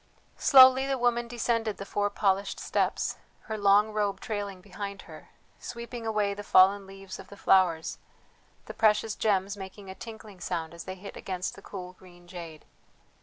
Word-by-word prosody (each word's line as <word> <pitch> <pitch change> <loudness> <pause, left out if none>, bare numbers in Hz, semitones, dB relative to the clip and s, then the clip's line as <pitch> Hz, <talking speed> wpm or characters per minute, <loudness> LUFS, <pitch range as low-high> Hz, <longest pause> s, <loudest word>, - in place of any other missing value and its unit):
Slowly 260 -1 +8
the 270 -1 0
woman 240 -1 +1
descended 230 -2 -1
the 195 - -7
four 205 +1 0
polished 200 -1 0
steps, - - -1 0.2
her 220 - -5
long 205 +1 +4
robe 205 -2 0
trailing 205 -3 -4
behind 200 +1 -7
her, - - -13 0.3
sweeping 235 -1 -7
away 210 -2 +1
the 205 - -7
fallen 195 +1 +5
leaves 195 0 -10
of - - -11
the 200 - -13
flowers, 175 -5 +2 0.7
the - - -8
precious 215 0 +2
gems 200 -2 0
making 190 0 -9
a - - -7
tinkling 220 -2 -11
sound 165 -3 -4
as 170 - -9
they 185 - -6
hit 195 +2 -10
against 185 -1 -4
the - - -13
cool 180 -2 -8
green 175 -1 -18
jade. 170 -4 -9
200 Hz, 170 wpm, -28 LUFS, 190-220 Hz, 0.7 s, Slowly